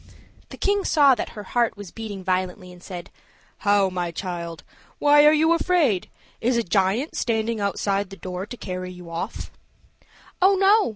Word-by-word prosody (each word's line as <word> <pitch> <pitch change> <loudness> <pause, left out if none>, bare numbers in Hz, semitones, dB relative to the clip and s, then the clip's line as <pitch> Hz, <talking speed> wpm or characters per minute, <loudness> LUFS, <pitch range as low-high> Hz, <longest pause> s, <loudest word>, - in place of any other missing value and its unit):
The - - -10
king 405 0 +1
saw 285 -6 +5
that - - -4
her 210 - -5
heart 235 +2 0
was 205 -3 -9
beating 210 -4 -7
violently, 185 -1 -2
and 175 - -15
said, 180 -2 -8 0.5
"How, 205 -1 +3
my 180 -1 -2
child, 170 -2 -5 0.3
why 295 0 +6
are - - +8
you 315 +2 +4
afraid? 330 - +1 0.3
Is 240 +1 +2
a 235 - +1
giant 200 - 0
standing 225 -1 -1
outside 200 -1 -1
the 195 - -10
door 185 +1 -6
to 245 - -8
carry 185 -3 -5
you 180 -2 -11
off?" 170 - -5 0.9
"Oh, 390 +2 +6
no!" 395 - +4
205 Hz, 170 wpm, -24 LUFS, 185-270 Hz, 0.9 s, are